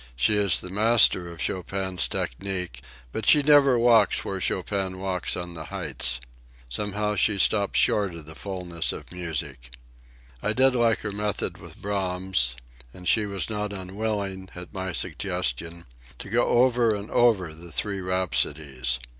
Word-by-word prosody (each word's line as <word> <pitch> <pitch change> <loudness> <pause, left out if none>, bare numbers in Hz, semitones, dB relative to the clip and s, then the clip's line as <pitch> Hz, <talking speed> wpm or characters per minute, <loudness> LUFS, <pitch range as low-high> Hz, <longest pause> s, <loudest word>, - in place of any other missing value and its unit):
She 65 +12 +2
is 100 -4 +3
the 90 - -7
master 105 -4 +5
of 85 - -11
Chopin's 95 -1 -1
technique, 90 -2 -3 0.3
but - - -4
she 150 - +7
never 140 -3 +6
walks 115 -4 +4
where 95 -1 -4
Chopin 95 0 -1
walks 95 -1 -2
on 90 -1 -4
the 80 -2 -7
heights. 70 -9 -2 0.5
Somehow, 105 +7 -2
she 105 -1 +2
stops 100 +2 +2
short 100 -5 +2
of 80 -2 -9
the 80 - -9
fulness 90 -2 -2
of - - -10
music. 75 -8 -5 0.7
I 105 - 0
did 130 +3 +5
like 120 -3 +2
her 105 - -3
method 105 0 -3
with - - -13
Brahms, 95 -10 0 0.4
and 90 +6 -10
she 110 -2 +3
was 100 -2 -3
not 105 -1 -3
unwilling, 95 0 -4
at 90 +1 -9
my 95 -2 -3
suggestion, 85 +1 -3 0.3
to 100 - -8
go 120 +1 +3
over 120 -2 +3
and 100 +1 -7
over 100 -9 +3
the 85 +2 -11
Three 100 +4 -2
Rhapsodies. 75 -8 0
95 Hz, 155 wpm, -25 LUFS, 85-105 Hz, 0.7 s, she